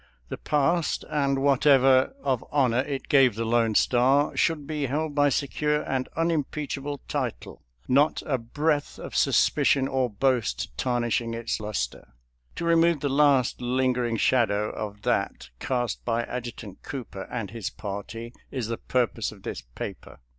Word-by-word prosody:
The - - -4
past, 155 +3 +1
and 140 -2 +1
what 140 0 +3
ever 135 - +5
of 130 -2 0
honor 130 -4 +2
it 135 0 -3
gave 135 -7 +5
the 115 +1 -2
Lone 115 -1 +2
Star, 130 +6 +3
should 160 -4 +1
be 150 -2 -2
held 150 +3 -2
by 145 0 +4
secure 150 +2 0
and 130 -1 -2
unimpeachable 145 -3 -2
title, - - -4 0.3
not 145 +4 +3
a 130 -4 0
breath 145 +5 -1
of - - -8
suspicion 135 -1 +3
or 130 -2 0
boast 115 - 0
tarnishing 120 - -1
its 115 0 -2
luster. 100 - -4 0.4
To 170 - -4
remove 165 -2 +3
the 145 - 0
last 135 -4 +3
lingering 125 -2 0
shadow 105 -4 +2
of 105 -1 -6
that - - -1
cast 120 -4 -2
by 120 0 0
Adjutant 120 -5 -7
Cooper 115 -8 -7
and 115 -6 -4
his 115 -4 -4
party 110 +3 -7 0.2
is 125 -5 -4
the 115 - -2
pur 125 -1 +1
pose 115 -1 -5
of 100 -3 -15
this - - -5
paper. - - -8
130 Hz, 155 wpm, -26 LUFS, 115-145 Hz, 0.4 s, ever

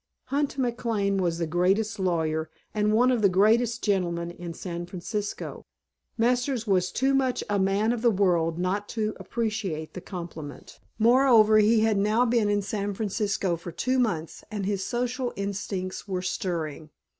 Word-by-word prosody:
Hunt 285 -1 0
McLane 230 -6 0
was 170 -2 0
the 170 - -1
greatest 195 +6 +1
lawyer 160 -4 0 0.2
and 210 0 +1
one 245 +4 +4
of 245 -3 +1
the 200 - +5
greatest 225 +5 +3
gentlemen 175 -4 0
in 175 0 -7
San 175 -1 -5
Francisco. 200 +3 -5 0.5
Masters 245 +1 +1
was 185 -3 +1
too 270 +2 +1
much 265 -2 +1
a 205 - +2
man 195 +4 +2
of 235 - -3
the 240 - +4
world 175 -5 +2
not 190 +3 -1
to 215 -1 -1
appreciate 210 -9 -3
the 185 - -7
compliment; 170 -6 -8 0.2
moreover, 230 -2 +6
he 215 +1 +4
had 220 -2 +2
now 215 +4 +3
been 230 -3 +2
in 205 -1 +1
San 200 0 -3
Francisco 200 -3 -1
for 170 +1 -8
two 255 +8 0
months 170 -10 -1
and 210 -3 -3
his 195 -1 -1
social 245 +2 -2
instincts 195 -1 -4
were 185 -2 -2
stirring. 160 -5 -3
205 Hz, 160 wpm, -26 LUFS, 180-230 Hz, 0.5 s, moreover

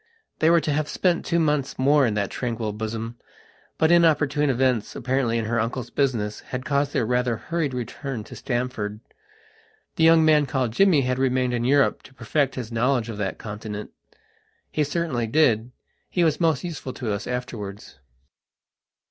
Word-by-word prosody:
They 160 - +4
were 170 0 +5
to 150 - -1
have 150 0 -1
spent 180 -2 0
two 170 - +1
months 150 -4 0
more 140 0 +4
in 110 - -1
that 100 -2 -1
tranquil 115 -3 -3
bosom, 110 +2 -5 0.6
but 160 +1 +3
inopportune 150 -4 +3
events, 125 -3 +1
apparently 130 -3 0
in 115 - -1
her 115 +2 0
uncle's 115 +2 -3
business, 115 -7 0
had 130 0 -6
caused 140 0 +1
their 115 - 0
rather 125 0 0
hurried 165 +1 -2
return 125 0 -5
to - - -11
Stamford. 120 -4 -3 1.0
The 160 - +2
young 165 0 +6
man 150 -2 +4
called 130 -4 -1
Jimmy 180 -1 +4
had 125 0 -1
remained 130 -1 +1
in 120 -1 -1
Europe 140 +2 +3
to 135 - -17
perfect 135 +3 0
his 120 -3 -5
knowledge 120 0 +1
of 110 - -5
that 95 -2 -2
continent. 105 0 -7 0.8
He 150 - +1
certainly 145 -6 -1
did: 120 -4 +2 0.4
he 175 - +1
was 160 0 +1
most 160 -5 +2
useful 160 -7 -5
to 115 -5 -3
us 100 - -4
afterwards. 110 - -6
130 Hz, 170 wpm, -24 LUFS, 115-150 Hz, 1.0 s, young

